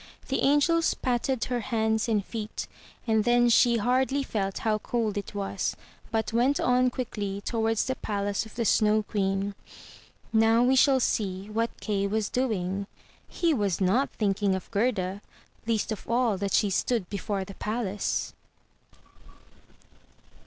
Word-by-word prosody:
The 270 - 0
angels 310 +4 +3
patted 250 0 -1
her 245 -1 -1
hands 220 -1 0
and 210 -3 +1
feet; 220 -2 -5 0.4
and 220 -2 +2
then 240 +1 +4
she 235 0 +5
hardly 260 +4 +1
felt 195 -6 -2
how 215 -1 +2
cold 225 -2 -1
it 205 0 -5
was, 195 -1 -2 0.3
but 225 0 -1
went 250 +5 +2
on 250 0 +3
quickly 205 -6 -4
towards 225 0 0
the 260 - -1
palace 205 -4 -2
of 220 - -16
the 235 -1 -1
Snow 215 0 +3
Queen. 195 -1 -1 0.8
Now 225 +1 +4
we 260 +2 +4
shall 265 0 +5
see 200 -4 -1
what 230 +2 -2
Kay 200 -2 0
was 215 +1 -1
doing. 200 -6 -1 0.4
He 340 -2 +1
was 205 - 0
not 205 +9 +2
think 200 -2 -1
ing 195 -2 +2
of 190 - -7
Gerda, 200 -3 0 0.5
least 225 -1 0
of 215 - -6
all 235 -2 +2
that 200 0 -2
she 205 -2 +3
stood 220 0 0
before 200 -1 -3
the 195 - -9
palace. 210 -1 -2
220 Hz, 150 wpm, -27 LUFS, 200-245 Hz, 0.8 s, she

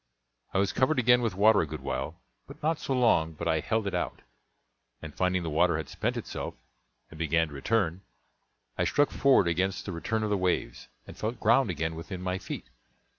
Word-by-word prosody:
I - - -1
was 100 0 +1
covered 130 +4 +2
again 125 0 +5
with 115 -6 -1
water 105 +2 +5
a 80 - -2
good 75 -1 -6
while, 70 +5 -4 0.3
but - - -13
not 160 +1 +1
so 135 - -2
long 85 -11 +3
but 85 +2 -5
I 80 -1 +2
held 110 +6 -1
it 100 - -2
out; - - -3 0.8
and 80 -2 -9
finding 90 -1 0
the 80 - -3
water 85 +1 +3
had 80 -3 -5
spent - - -2
itself, - - -5 0.6
and 80 - -12
began 80 0 +1
to - - -11
return, 90 +4 0 0.8
I - - +3
struck 145 0 +2
forward 135 -9 +4
against 90 +3 0
the 100 - -4
return 110 +7 -2
of 105 - -1
the 100 - +2
waves, 90 -9 -1 0.2
and - - -11
felt 115 +2 -4
ground 115 +2 +4
again 80 -1 -2
with 80 +1 -8
my 90 +1 -2
feet. - - -7
90 Hz, 205 wpm, -28 LUFS, 80-110 Hz, 0.8 s, again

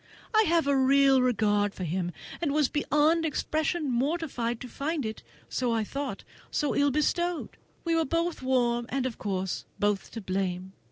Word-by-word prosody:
I 435 0 +5
have 335 -1 +3
a 280 0 +3
real 270 0 +5
regard 210 -5 +2
for 185 - -5
him, 175 +1 -1 0.3
and 320 -4 +1
was 300 -3 +3
beyond 300 +2 +2
expression 310 +1 -1
mortified 255 -3 -1
to 250 - -6
find 285 +3 -2
it, 220 0 -5 0.3
as - - -2
I 230 -3 +1
thought, 280 +6 -4 0.3
so 295 - 0
ill 285 0 +4
bestowed. 345 +4 0 0.3
We 335 - +1
were 325 - +3
both 335 +2 -1
warm, 240 -2 +1
and 270 -1 -1
of 250 -3 -4
course 190 -2 -2
both 205 -1 0
to 225 - -5
blame. 185 -1 -2
265 Hz, 170 wpm, -28 LUFS, 220-305 Hz, 0.3 s, I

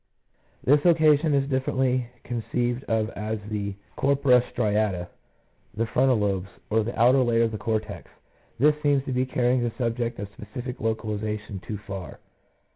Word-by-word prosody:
This 145 +2 +4
location 155 -3 +4
is 135 -1 +1
differently 130 -2 0 0.2
conceived 120 +1 -2
of 110 0 0
as 110 +2 -4
the 100 -2 -3 0.2
corpora 135 -2 +4
striata, 105 -6 -1 0.7
the 115 +1 0
frontal 130 +2 +3
lobes, 100 -2 -1 0.2
or 110 +1 +3
the 115 +2 -5
outer 125 +3 +6
layer 115 -2 +3
of 115 - +1
the 110 - -5
cortex: 110 -2 -3 0.5
this 150 +5 +5
seems 145 -2 +2
to - - -3
be 130 +1 0
carrying 125 0 +1
the 120 -1 0
subject 120 -1 -1
of 100 - -5
specific 120 +5 -7
localiza 110 -1 -2
tion 100 -2 -7
too 105 +3 -6
far. 95 -7 -7
115 Hz, 155 wpm, -25 LUFS, 105-130 Hz, 0.7 s, outer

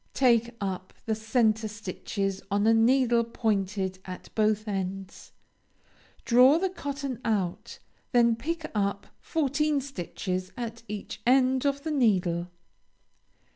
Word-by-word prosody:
Take 235 -2 +3
up 185 -2 -4
the 220 - 0
centre 220 0 +1
stitches 200 -1 -4
on 205 +1 +1
a 225 - +5
needle 235 +1 +4
pointed 200 -4 -1
at 185 -1 -9
both 215 0 +1
ends, 195 -1 -5 0.9
draw 255 +5 +6
the 375 +2 0
cotton 280 -6 -5
out; 200 -6 -2 0.3
then 235 -2 +4
pick 320 +7 -4
up 200 -1 -1
fourteen 300 -1 0
stitches 185 -7 -4
at 230 -1 -5
each 210 -1 -6
end 260 +1 +4
of 280 0 -1
the 315 - -2
needle. 185 - +2
225 Hz, 120 wpm, -27 LUFS, 195-260 Hz, 0.9 s, draw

